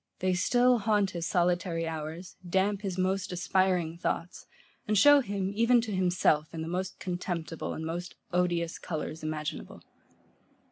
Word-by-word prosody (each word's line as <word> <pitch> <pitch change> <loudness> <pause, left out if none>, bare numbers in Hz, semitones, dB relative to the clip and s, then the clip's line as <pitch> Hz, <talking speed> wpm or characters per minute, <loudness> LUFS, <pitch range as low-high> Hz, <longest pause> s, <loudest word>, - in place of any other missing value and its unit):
They 185 0 +1
still 245 +6 +3
haunt 205 -2 +2
his 170 -1 -3
solitary 175 -1 +1
hours, 160 +3 -6
damp 195 +2 +1
his 190 -3 -3
most 190 +1 0
aspiring 180 -2 +1
thoughts, 175 -1 -3 0.4
and 215 0 +2
show 290 +7 +8
him, 200 -6 -2
even 230 +3 +4
to 225 -2 -5
himself, 175 -4 +2
in 160 - -3
the - - -5
most 185 +2 -3
contemptible 175 -3 -4
and 160 - -5
most 175 +2 -5 0.2
odious 175 -2 0
colours 160 -1 -5
imaginable. 155 -1 -5
180 Hz, 145 wpm, -29 LUFS, 165-195 Hz, 0.4 s, show